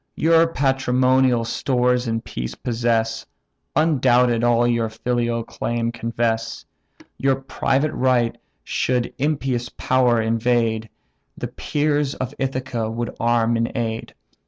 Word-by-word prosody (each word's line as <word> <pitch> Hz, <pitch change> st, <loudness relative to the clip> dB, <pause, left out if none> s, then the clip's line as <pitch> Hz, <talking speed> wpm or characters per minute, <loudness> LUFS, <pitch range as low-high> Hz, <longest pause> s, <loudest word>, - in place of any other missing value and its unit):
Your 165 Hz, +1 st, +4 dB
patrimonial 130 Hz, -4 st, +2 dB
stores 125 Hz, +1 st, +1 dB
in 115 Hz, 0 st, -1 dB
peace -, -, -6 dB
possess; 115 Hz, -1 st, -1 dB, 0.5 s
Undoubted, 125 Hz, -6 st, +3 dB
all 120 Hz, 0 st, +3 dB
your 115 Hz, -2 st, +1 dB
filial 120 Hz, +1 st, -1 dB
claim 115 Hz, 0 st, -2 dB
confess: 115 Hz, -1 st, -2 dB, 0.5 s
Your 135 Hz, 0 st, +2 dB
private 135 Hz, +2 st, 0 dB
right 125 Hz, -3 st, +2 dB, 0.3 s
should 125 Hz, -, -1 dB
impious 135 Hz, -5 st, -1 dB
power 125 Hz, +1 st, +2 dB
invade, 115 Hz, -1 st, +1 dB, 0.5 s
The -, -, -4 dB
peers 145 Hz, -1 st, -1 dB
of 130 Hz, -, -4 dB
Ithaca 130 Hz, -4 st, -2 dB
would 115 Hz, +1 st, -4 dB
arm 115 Hz, 0 st, +2 dB
in 115 Hz, 0 st, -1 dB
aid. 115 Hz, -1 st, -3 dB
120 Hz, 110 wpm, -22 LUFS, 115-130 Hz, 0.5 s, Your